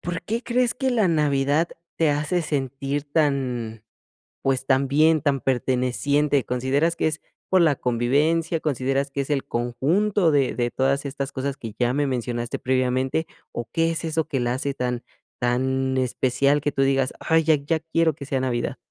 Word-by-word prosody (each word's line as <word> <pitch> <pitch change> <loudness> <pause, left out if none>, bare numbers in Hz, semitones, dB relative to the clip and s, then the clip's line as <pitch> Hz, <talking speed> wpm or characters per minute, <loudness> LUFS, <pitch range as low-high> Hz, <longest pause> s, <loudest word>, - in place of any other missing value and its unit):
¿por 170 -1 -4
qué 230 +3 -3
crees 245 0 +1
que 265 0 -1
la 225 -6 +2
Navidad 150 0 +2 0.3
te 160 -2 +3
hace 155 +5 0
sentir 140 -1 -2
tan, 130 -7 -1 0.6
pues, 135 -1 0
tan 135 0 +2
bien, 155 +2 +4
tan 140 -3 +1
perteneciente? 135 +2 +1
¿Consideras 135 +7 0
que - - +1
es 155 0 -3 0.3
por 185 -2 +4
la 155 -4 +4
convivencia? 145 +8 +1
¿Consideras 135 -1 -1
que 140 - -1
es 135 - -6
el 140 -2 0
conjunto 160 - +1
de 140 -3 +2
de 120 -1 -1
todas 135 +1 +1
estas 140 0 -4
cosas 135 0 -3
que 115 -5 -8
ya 120 0 +2
me 145 0 +1
mencionaste 120 -2 -2
previamente? 130 +4 0 0.2
¿O 120 -1 -5
qué 165 0 +2
es 165 0 -3
eso 160 -1 -1
que 135 - -1
la 120 0 0
hace 140 +2 -2
tan 125 -2 -3 0.4
tan 130 +2 0
especial 130 +3 +1
que 145 - 0
tú 135 - +1
digas, 135 -1 +1
ay, 160 -1 +2
ya 155 0 +4
ya 150 +3 -1
quiero 165 0 +1
que 140 - -8
sea 135 -1 -1
navidad? 125 -2 -1
140 Hz, 180 wpm, -24 LUFS, 130-155 Hz, 0.6 s, bien